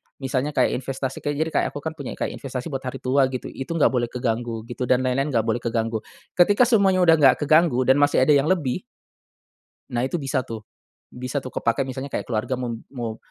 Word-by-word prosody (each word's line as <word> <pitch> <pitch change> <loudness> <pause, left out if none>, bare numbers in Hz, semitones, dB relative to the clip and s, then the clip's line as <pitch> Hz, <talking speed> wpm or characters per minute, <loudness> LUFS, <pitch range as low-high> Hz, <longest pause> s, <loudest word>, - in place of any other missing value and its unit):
misalnya 135 +2 -2
kayak - - +2
investasi 135 0 -4
kayak 145 0 -2
jadi 160 - -4
kayak - - +1
aku 145 - -6
kan 160 - -2
punya 145 -5 -7
kayak - - -3
investasi 130 +3 -5
buat 135 -1 -3
hari 130 +1 -6
tua 130 +1 +3
gitu, 130 -1 -5
itu 135 - -7
enggak 160 - +4
boleh 120 -2 0
keganggu 115 -2 -3
gitu 120 +2 -5
dan 130 0 +3
lain-lain 130 +2 0
enggak 115 - +3
boleh 115 +1 0
keganggu. 115 -1 -1 0.4
Ketika 205 +7 +6
semuanya 200 -6 +4
udah 165 -2 +5
enggak 135 0 +5
keganggu 155 -3 +4
dan 130 +2 +4
masih 145 -2 +4
ada 140 - +4
yang 145 +1 +4
lebih 155 -9 0 1.1
nah, 120 +1 +1
itu 135 - -3
bisa 135 -2 -1
tuh 115 -3 -6 0.5
bisa 125 +3 -4
tuh 130 - -7
kepake 115 +3 0
misalnya 130 +2 -6
kayak - - 0
keluarga 110 +2 -1
mau 125 -1 -3 0.2
mau 115 -4 -4
130 Hz, 210 wpm, -23 LUFS, 125-145 Hz, 1.1 s, Ketika